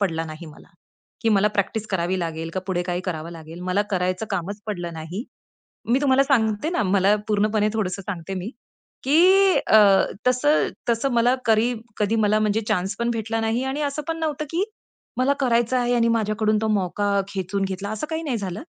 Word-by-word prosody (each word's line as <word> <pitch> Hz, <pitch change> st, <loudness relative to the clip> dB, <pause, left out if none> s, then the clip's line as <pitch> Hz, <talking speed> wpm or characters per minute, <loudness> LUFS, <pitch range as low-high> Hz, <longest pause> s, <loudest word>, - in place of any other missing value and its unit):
पडला 165 Hz, -5 st, 0 dB
नाही 155 Hz, +1 st, -9 dB
मला. 155 Hz, -1 st, -14 dB, 0.5 s
की 225 Hz, -, +2 dB
मला 210 Hz, 0 st, +4 dB
प्रॅक्टिस 210 Hz, +1 st, -2 dB
करावी 185 Hz, 0 st, 0 dB
लागेल 165 Hz, -1 st, -4 dB
का, 185 Hz, -, -1 dB
पुढे 180 Hz, -2 st, -1 dB
काही 175 Hz, 0 st, -2 dB
करावं 165 Hz, -3 st, -4 dB
लागेल. 165 Hz, +1 st, -10 dB
मला 190 Hz, +3 st, +2 dB
करायचं 185 Hz, +2 st, -1 dB
कामच 200 Hz, +4 st, -3 dB
पडलं 175 Hz, -5 st, -4 dB
नाही. 165 Hz, +8 st, -6 dB, 0.7 s
मी 255 Hz, -, +4 dB
तुम्हाला 275 Hz, -1 st, +4 dB
सांगते 230 Hz, -1 st, +1 dB
ना, 350 Hz, -6 st, 0 dB
मला 195 Hz, +1 st, +3 dB
पूर्णपणे 210 Hz, 0 st, +2 dB
थोडंसं 195 Hz, -3 st, -2 dB
सांगते 185 Hz, -2 st, -5 dB
मी 190 Hz, +5 st, -5 dB, 0.5 s
की 285 Hz, +5 st, +4 dB, 0.5 s
अ, 220 Hz, -, +6 dB, 0.5 s
तसं-तसं 255 Hz, -2 st, +1 dB
मला 240 Hz, +2 st, +3 dB
करी 225 Hz, +2 st, +3 dB, 0.2 s
कधी 210 Hz, +1 st, +1 dB
मला 210 Hz, 0 st, +3 dB
म्हणजे 215 Hz, +1 st, +1 dB
चान्स 190 Hz, +3 st, 0 dB
पण 235 Hz, 0 st, 0 dB
भेटला 225 Hz, 0 st, -2 dB
नाही 225 Hz, +3 st, 0 dB
आणि 290 Hz, +3 st, -3 dB
असं 290 Hz, +1 st, -2 dB
पण 330 Hz, 0 st, -2 dB
नव्हतं 305 Hz, -2 st, -2 dB
की, 340 Hz, +3 st, +1 dB, 0.5 s
मला 260 Hz, +2 st, +3 dB
करायचं 240 Hz, -1 st, +2 dB
आहे 245 Hz, 0 st, +1 dB
आणि 235 Hz, -1 st, +3 dB
माझ्याकडून 215 Hz, 0 st, +1 dB
तो 220 Hz, -, 0 dB
मौका 200 Hz, +2 st, -1 dB, 0.2 s
खेचून 195 Hz, 0 st, -2 dB
घेतला. 195 Hz, +1 st, -5 dB
असं 220 Hz, +7 st, -4 dB
काही 320 Hz, 0 st, -3 dB
नाही 270 Hz, -7 st, -1 dB
झालं. 195 Hz, +1 st, -5 dB
210 Hz, 180 wpm, -23 LUFS, 185-240 Hz, 0.7 s, अ